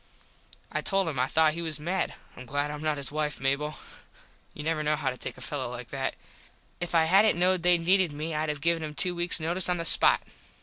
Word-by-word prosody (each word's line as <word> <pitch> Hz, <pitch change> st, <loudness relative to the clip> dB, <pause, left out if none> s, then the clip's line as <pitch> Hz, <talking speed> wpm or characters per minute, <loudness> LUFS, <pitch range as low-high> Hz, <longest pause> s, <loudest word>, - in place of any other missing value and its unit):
I -, -, -2 dB
told 195 Hz, -3 st, +1 dB
him 145 Hz, -5 st, -3 dB
I 130 Hz, -, +1 dB
thought 155 Hz, +1 st, +3 dB
he 170 Hz, -, -4 dB
was 160 Hz, -2 st, -3 dB
mad. 180 Hz, +5 st, -2 dB, 0.2 s
Im 130 Hz, -, -11 dB
glad 145 Hz, +3 st, -2 dB
Im 150 Hz, 0 st, -7 dB
not 155 Hz, -1 st, -1 dB
his 140 Hz, 0 st, -5 dB
wife, 150 Hz, -1 st, -3 dB
Mable. 140 Hz, +3 st, -1 dB, 0.8 s
You 150 Hz, -, -7 dB
never 155 Hz, 0 st, -1 dB
know 150 Hz, 0 st, +1 dB
how 145 Hz, -3 st, -2 dB
to -, -, -8 dB
take -, -, -6 dB
a -, -, -13 dB
fello 135 Hz, -4 st, -3 dB
like 125 Hz, -1 st, -8 dB
that. 135 Hz, -1 st, -3 dB, 0.6 s
If 175 Hz, 0 st, -4 dB
I 165 Hz, -, +5 dB
hadnt 195 Hz, +6 st, +4 dB
knowed 180 Hz, 0 st, +2 dB
they 175 Hz, 0 st, +4 dB
needed 180 Hz, 0 st, +3 dB
me 155 Hz, +3 st, -5 dB
Id 155 Hz, 0 st, -2 dB
have 150 Hz, -1 st, -4 dB
given 170 Hz, 0 st, +1 dB
him 150 Hz, -1 st, -6 dB
two 180 Hz, +5 st, +2 dB
weaks 175 Hz, 0 st, -1 dB
notise 170 Hz, +3 st, 0 dB
on 180 Hz, -, +1 dB
the 165 Hz, -, -4 dB
spot. -, -, +6 dB
155 Hz, 235 wpm, -27 LUFS, 145-175 Hz, 0.8 s, spot